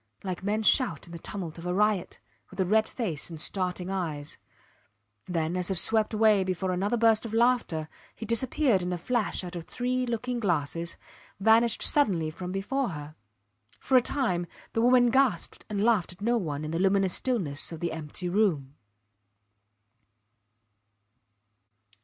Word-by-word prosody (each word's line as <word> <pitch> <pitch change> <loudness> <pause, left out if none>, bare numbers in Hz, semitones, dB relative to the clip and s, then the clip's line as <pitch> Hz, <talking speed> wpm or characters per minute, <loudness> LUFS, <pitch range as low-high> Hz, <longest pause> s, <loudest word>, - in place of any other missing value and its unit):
like 185 -3 -4
men 210 +3 -1
shout 215 - +3
in 170 - -12
the 170 - -8
tumult 175 -3 -6
of 165 - -9
a 180 - -1
riot, 210 -2 0 0.3
with - - -14
a 190 - +2
red 220 +4 +2
face 180 - -3
and 165 -2 -8
starting 180 +1 -2
eyes; 155 -6 -4 0.9
then, 165 -1 -1
as 180 0 0
if 190 - +1
swept 220 +4 +6
away 215 -3 +4
before 185 0 -2
another 200 +6 0
burst 225 -1 +3
of 225 -1 -5
laughter, 235 -10 +1 0.3
he 225 - -7
disappeared 235 -1 +2
in 180 0 -3
a 180 - -2
flash 220 +2 -1
out 180 0 -7
of 170 -2 -6
three 250 +1 -2
looking 240 +1 -2
glasses, 170 -3 -1 0.4
vanished 225 +2 +4
suddenly 180 - +2
from 180 +3 -7
before 245 +8 -2
her. 150 -3 -8 0.7
For 265 - 0
a 255 - +7
time 185 -11 -1 0.3
the 225 - +1
woman 245 0 +5
gasped 250 -9 0
and 205 -1 -1
laughed 215 -7 +2
at 180 - -21
no 235 +3 +1
one 155 -9 -3
in 155 - -5
the 165 - -2
luminous 195 -1 +2
stillness 180 - 0
of 165 - -7
the 170 +1 -2
empty 160 +3 -4
room. 175 -9 0
195 Hz, 165 wpm, -27 LUFS, 170-230 Hz, 0.9 s, a